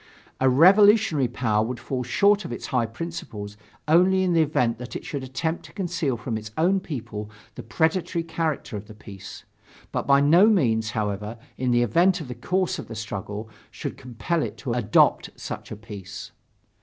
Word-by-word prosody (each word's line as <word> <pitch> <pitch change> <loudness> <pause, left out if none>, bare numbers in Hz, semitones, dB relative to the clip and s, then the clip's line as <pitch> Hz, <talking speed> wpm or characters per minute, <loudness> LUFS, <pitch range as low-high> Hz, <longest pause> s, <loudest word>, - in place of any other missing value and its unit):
A 130 - +4
revolutionary 190 - +5
power 110 -3 0
would 120 +1 -4
fall 125 +1 -3
short 200 - +3
of 170 - -7
its - - -5
high 125 -3 0
principles 115 -6 -7 0.3
only 185 +4 +4
in 180 -2 +1
the 165 - +4
event 125 -7 +1
that 125 0 -8
it - - -6
should 140 - -4
attempt 145 +6 -3
to - - -14
conceal 170 - -2
from 115 -1 -3
its 110 0 -9
own 185 +4 +3
people 120 - -6 0.2
the - - -8
predatory 165 +6 0
character 160 -6 -3
of 105 0 -7
the 110 - -12
peace, 100 -2 -11 0.5
but - - -3
by 140 0 +6
no 165 +8 +6
means, 115 - +2
however, 105 +1 -3 0.2
in 130 0 -1
the 120 0 +3
event 175 - +3
that 170 - -5
the - - -3
course 180 +10 -1
of - - -7
the 115 - -8
struggle 105 0 -5 0.2
should - - -6
compel 130 +7 -3
it - - -4
to 125 -4 -3
adopt 115 -3 +3
such - - -7
a - - -6
peace. 100 -3 -9
130 Hz, 185 wpm, -24 LUFS, 110-170 Hz, 0.5 s, by